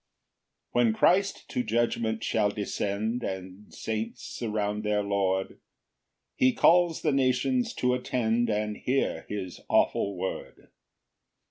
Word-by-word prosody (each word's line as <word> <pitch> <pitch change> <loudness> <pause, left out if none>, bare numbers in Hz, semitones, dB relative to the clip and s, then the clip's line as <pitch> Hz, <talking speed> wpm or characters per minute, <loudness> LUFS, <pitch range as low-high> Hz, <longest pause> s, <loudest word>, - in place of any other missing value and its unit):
1 120 0 +3
When 110 - +2
Christ 195 - +2
to - - -1
judgment 115 -1 0
shall 105 -2 +2
descend 105 +3 -2
And 95 0 -6
saints 110 +1 -4
surround 105 -2 -3
their 105 -1 +1
Lord, 95 -1 -1 0.8
He 130 0 +3
calls 175 -1 +4
the 155 - +3
nations 130 -1 +1
to 125 0 +1
attend, 120 -2 0
And 105 0 -1
hear 135 +2 -1
his 95 -4 -5
awful 100 -2 +2
word. 95 +1 -6
110 Hz, 120 wpm, -28 LUFS, 105-125 Hz, 0.8 s, calls